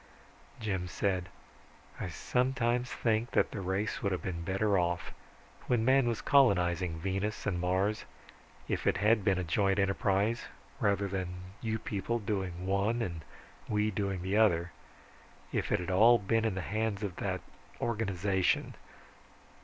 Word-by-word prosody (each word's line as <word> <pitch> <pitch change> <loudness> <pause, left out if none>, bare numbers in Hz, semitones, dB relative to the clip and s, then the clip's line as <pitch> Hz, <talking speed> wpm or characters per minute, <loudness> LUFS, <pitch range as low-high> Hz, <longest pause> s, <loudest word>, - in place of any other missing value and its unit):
Jim 95 -5 -2
said, 90 -1 -1 0.7
"I 95 - -3
sometimes 125 +4 0
think 115 0 0
that - - +3
the 100 - -4
race 95 +3 -2
would 100 - 0
have 90 - -2
been 85 -3 -3
better 100 +3 +1
off, 85 0 -1 0.5
when 120 -2 +2
man 130 0 +4
was 115 -2 -1
colonizing 90 -10 +3
Venus 95 +4 -2
and 90 -4 0
Mars, 95 +4 0 0.6
if - - -2
it - - +3
had 105 0 +3
been 95 -1 +2
a 95 - -1
joint 95 +4 +1
enterprise 100 +2 +1 0.3
rather 100 0 +1
than 95 -2 -2 0.3
you 110 -1 -1
people 110 +2 -2
doing 95 -5 -3
one, 100 +5 +1
and 85 -5 -4 0.5
we 105 0 +1
the 95 -1 -1
other. 85 -6 +3 0.8
If - - -1
it 105 - +3
had 90 +1 -3
all 115 +6 +7
been 115 +2 0
in 110 -4 0
the 95 - -2
hands 110 -1 -1
of 95 -3 -4
that 95 -2 -2 0.4
organization 100 -4 0
100 Hz, 145 wpm, -31 LUFS, 95-110 Hz, 0.8 s, all